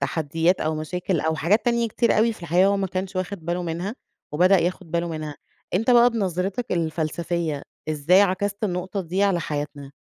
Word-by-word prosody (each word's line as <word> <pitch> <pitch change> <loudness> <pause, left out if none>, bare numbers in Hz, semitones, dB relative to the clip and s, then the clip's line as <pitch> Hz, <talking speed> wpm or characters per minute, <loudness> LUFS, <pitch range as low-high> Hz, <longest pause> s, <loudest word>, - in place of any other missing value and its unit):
تحديات 165 +4 0
أو 155 0 0
مشاكل 170 +2 -2
أو 160 +1 0
حاجات 170 +9 +2
تانية 235 -1 +1
كتير 235 +1 +1
أوي 230 +1 +3
في 220 - -14
الحقيقة 175 +3 +3
هو 200 0 +3
ما 195 -1 0
كانش 185 +1 -4
واخد 185 -1 -4
باله 175 +1 -1
منها، 175 +5 -3 0.4
وبدأ 180 +5 +5
ياخد 175 0 -2
باله 170 +1 -1
منها، 155 -2 -5 0.4
أنت 225 +7 +2
بقى 240 0 +7
بنظرتك 195 +1 -2
الفلسفية 165 -1 -2 0.3
إزاي 155 +5 +4
عكست 200 +2 -1
النقطة 185 +1 -2
دي 185 +2 -1
على 195 -4 +2
حياتنا؟ 145 -2 -5
180 Hz, 180 wpm, -24 LUFS, 160-195 Hz, 0.4 s, بقى